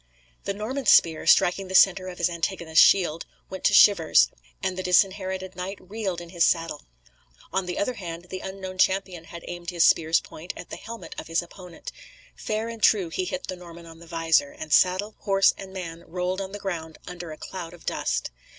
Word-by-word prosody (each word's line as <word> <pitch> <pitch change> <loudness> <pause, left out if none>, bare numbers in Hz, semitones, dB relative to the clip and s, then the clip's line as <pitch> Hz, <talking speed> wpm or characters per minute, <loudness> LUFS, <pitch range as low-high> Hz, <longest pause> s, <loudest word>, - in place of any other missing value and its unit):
The 200 - -1
Norman's 250 +6 -2
spear, 160 -2 +5
striking 185 +2 +4
the 190 - -4
centre 190 0 +5
of 180 -1 -7
his 175 - +2
antagonist's 170 -1 +2
shield, 170 -4 +3 0.2
went 190 -1 -7
to 195 - +4
shivers, 160 - +6 0.3
and 185 - -1
the 185 - -3
Disinherited 190 0 +1
Knight 185 +2 -5
reeled 195 -2 -4
in 170 - -10
his 170 -1 +1
saddle. 165 - 0 0.7
On 190 -1 -1
the 180 - -4
other 250 +5 0
hand, 175 -5 -7
the 185 - -4
unknown 190 -1 -7
champion 185 -3 +1
had 170 0 -10
aimed 175 -1 -6
his 170 -2 +2
spear's 160 0 +4
point 170 +4 -9
at - - -10
the - - -4
helmet 230 +1 -9
of - - -8
his 165 +2 0
opponent. 175 -1 -11 0.4
Fair 220 +1 -3
and 230 -1 -8
true 195 -5 +4
he 185 +3 -2
hit 275 +7 -4
the 185 - -5
Norman 170 -1 -12
on 165 0 -13
the 170 - -14
visor, 165 -3 +2
and 155 -1 -5
saddle, 185 +6 +3
horse, 195 -1 +3
and 195 -1 -10
man 170 -3 -7
rolled 180 +2 -2
on 190 0 -6
the 205 - -6
ground 165 -5 -5
under 175 -2 -8
a 155 - -8
cloud 175 -3 -7
of 175 -1 -15
dust. - - -2
180 Hz, 205 wpm, -25 LUFS, 170-195 Hz, 0.7 s, shivers